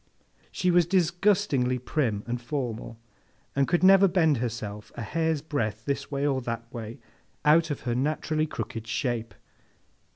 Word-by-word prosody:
She 180 - +1
was 175 -1 +4
disgustingly 175 -7 +2
prim 120 -5 -1
and 120 0 -3
formal, 120 -4 -4 0.6
and 140 0 +2
could 175 +1 +1
never 195 +1 +7
bend 165 -6 +3
herself 110 -3 -5
a 115 - -5
hair's 160 +2 -1
breadth 115 -9 -2
this 140 -1 -2
way 140 -1 -1
or 135 -2 +1
that 115 -1 -4
way, 115 0 -6 0.5
out 160 +2 +5
of 145 - -3
her 120 - -1
naturally 155 +4 0
crooked 115 -4 -5
shape. 115 -1 -2
140 Hz, 150 wpm, -27 LUFS, 115-160 Hz, 0.6 s, never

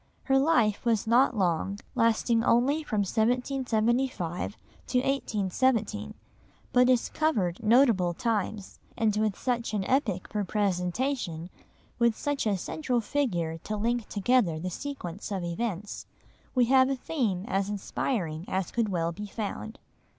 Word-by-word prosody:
Her 270 -1 +3
life 240 -9 +2
was 230 -4 +1
not 240 +1 +4
long, 190 +1 0 0.2
lasting 230 0 +2
only 265 +8 +3
from 215 -9 -1
1775 235 -3 0 0.3
to 250 - 0
1817, 215 -3 0 0.6
but 250 0 +5
it 250 -2 +2
covered 220 - 0
notable 215 -7 +4
times, 215 -2 -2 0.2
and 215 -2 +2
with 215 -2 0
such 235 -3 -1
an 200 - 0
epoch 210 -6 0
for 210 -1 -1
presentation, 185 - -1 0.5
with 235 -2 +3
such 290 -5 -1
a 200 -2 +1
central 250 - -1
figure 180 - -1
to 215 +5 -4
link 235 +1 -1
together 205 -6 +2
the 180 +3 -4
sequence 210 -7 -6
of 190 -3 -2
events, 200 +2 -4 0.5
we 250 -1 +5
have 260 +1 +5
a 275 - +1
theme 235 - -2
as 195 -1 0
inspiring 190 - -2
as 190 -1 -2
could 230 -3 0
well 170 -3 0
be 205 +5 -7
found. 220 +1 -5
220 Hz, 135 wpm, -28 LUFS, 190-250 Hz, 0.6 s, but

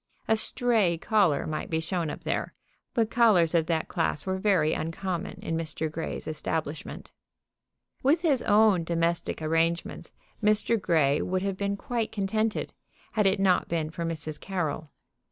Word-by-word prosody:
A 220 - +4
"stray" 220 -5 +2
caller 185 -5 +2
might 155 -1 -4
be 160 - 0
shown 165 0 -2
up - - -6
there, - - -3 0.4
but 225 -2 +1
callers 205 -9 +4
of 165 -2 +2
that 160 -2 0
class 165 -4 -1
were 190 0 -1
very 185 -6 +2
uncommon 170 +2 -3
in 165 - -2
Mr. 160 -1 -2
Grey's 160 +1 -5
establishment. 155 -1 -4 0.9
With 300 +6 +2
his 280 -7 +3
own 205 -4 +4
domestic 165 -1 -1
arrangements 165 +2 -1 0.3
Mr. 215 +1 +2
Grey 150 -5 +2
would 185 +1 -1
have 195 -1 -1
been 200 +1 -2
quite 230 +1 -2
contented, 215 +2 -1 0.4
had 210 -3 +3
it 195 0 +2
not 190 -2 +3
been 160 -2 -2
for 170 - -5
Mrs. 155 -2 -4
Carroll. 160 -5 -3
175 Hz, 155 wpm, -27 LUFS, 160-210 Hz, 0.9 s, A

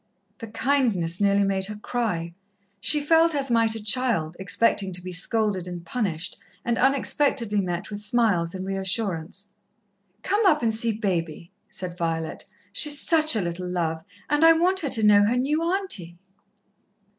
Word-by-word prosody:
The 225 - -7
kindness 220 -8 0
nearly 200 0 +3
made 195 -1 -1
her 210 - -6
cry. 210 -7 -3 0.5
She 300 +9 +2
felt 325 +2 +3
as 275 -3 -1
might 230 -1 +2
a 220 - -7
child, 210 -8 0
expecting 195 0 +1
to 180 - -6
be 185 - -6
scolded 195 0 0
and 175 -1 -7
punished, 180 -5 -3 0.3
and 235 0 0
unexpectedly 265 -5 +1
met 175 +1 -4
with 205 0 -5
smiles 205 -6 +1
and 185 0 -5
re 195 0 -3
assurance. 190 -1 -3 0.7
"Come 410 +3 +1
up 300 -7 +3
and 225 -1 +1
see 225 +1 +2
Baby," 170 -5 -3 0.2
said 185 -4 -8
Violet. 165 -1 -3 0.3
"She's 295 -2 +4
such 310 -3 +4
a 215 - +1
little 175 +1 -4
love, 165 -3 -2 0.2
and 295 +2 +1
I 330 0 +8
want 360 +4 +1
her 295 - -3
to 225 -3 +2
know 205 -1 +6
her 235 +4 +1
new 290 +5 0
auntie." 335 - -2
210 Hz, 165 wpm, -24 LUFS, 180-255 Hz, 0.7 s, I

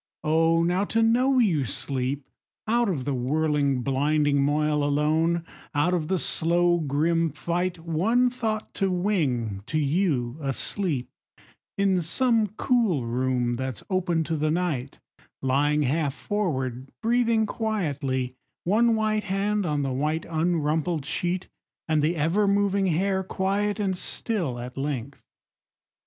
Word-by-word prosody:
Oh, 165 +2 +3
now 180 +3 +1
to 225 +2 +1
know 250 +4 +3
you 185 - +3
sleep! 130 +4 -2 0.4
Out 235 0 +2
of 140 -9 -2
the 145 - -1
whirling 140 0 0
blinding 145 +1 +2
moil, 150 +1 +1
alone, 155 +4 +1 0.3
Out 165 +5 +2
of 165 -4 0
the 190 - +1
slow 175 +1 +2
grim 165 +3 +1
fight, 175 +4 -2
One 180 +10 +1
thought 220 -3 -3
to 195 - +3
wing 145 - 0
to 155 - -1
you, 145 -4 0
asleep, 140 +1 -1 0.7
In 195 -2 +2
some 225 +6 +2
cool 210 - +1
room 120 0 0
that's 130 -2 -4
open 175 -3 +1
to 160 +1 -2
the 155 +1 0
night 155 -6 -2 0.4
Lying 145 +3 +2
half 145 +1 0
forward, 135 - -2
breathing 230 -1 +2
quietly, 145 - -2 0.3
One 225 +5 +3
white 215 -1 0
hand 200 0 0
on 145 -2 0
the 135 -1 -1
white 150 +4 -1
Unrumpled 160 -1 0
sheet, 175 +6 -2 0.4
and 155 -2 +2
the 160 +4 +1
ever 170 +7 +1
moving 200 -1 +2
hair 190 +3 +1
Quiet 200 +3 -1
and 195 -2 0
still 180 - -2
at 125 +2 -7
length! 140 -2 -4
165 Hz, 135 wpm, -25 LUFS, 140-195 Hz, 0.7 s, Oh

